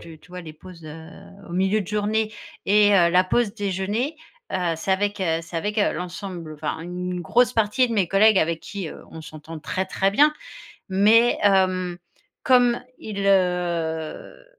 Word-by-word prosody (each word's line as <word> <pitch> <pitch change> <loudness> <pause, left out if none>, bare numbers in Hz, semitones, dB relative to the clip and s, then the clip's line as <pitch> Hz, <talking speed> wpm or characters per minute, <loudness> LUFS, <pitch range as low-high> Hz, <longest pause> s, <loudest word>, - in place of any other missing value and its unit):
tu 165 -2 -12
tu - - -22
vois 180 0 -7
les 160 -3 -10
pauses, 170 +1 -14
heu, 160 +1 -10 0.4
au - - -9
milieu 190 +4 +1
de 195 - -6
journée 215 +2 -1 0.3
et 205 +1 +5
heu, 170 -2 +4
la 180 +1 +5
pause 210 +2 0
déjeuner, 205 - -2 0.4
heu, 175 -3 0
c'est 160 +4 -4
avec, 205 +2 0
heu, 165 -3 +1
c'est 165 0 -8
avec, 210 +6 -2
heu, 205 - +2
l'ensemble, 175 -2 -6
enfin, 155 +1 -4
une 180 +1 -5
grosse 240 +8 +2
partie 225 +3 +2
de - - -3
mes 195 -5 +1
collègues 200 +2 +5
avec 165 -1 0
qui, 200 -6 -6
heu, - - -11
on 160 - -9
s'entend 155 +1 -10
très, 190 +5 -2
très 195 +1 0
bien. 295 +9 +4 0.6
Mais, 215 +5 +4
hem, 185 -3 +2 0.5
comme 245 -2 +4 0.2
ils, 200 -2 -5
heu, 175 - -1
190 Hz, 175 wpm, -23 LUFS, 170-210 Hz, 0.6 s, et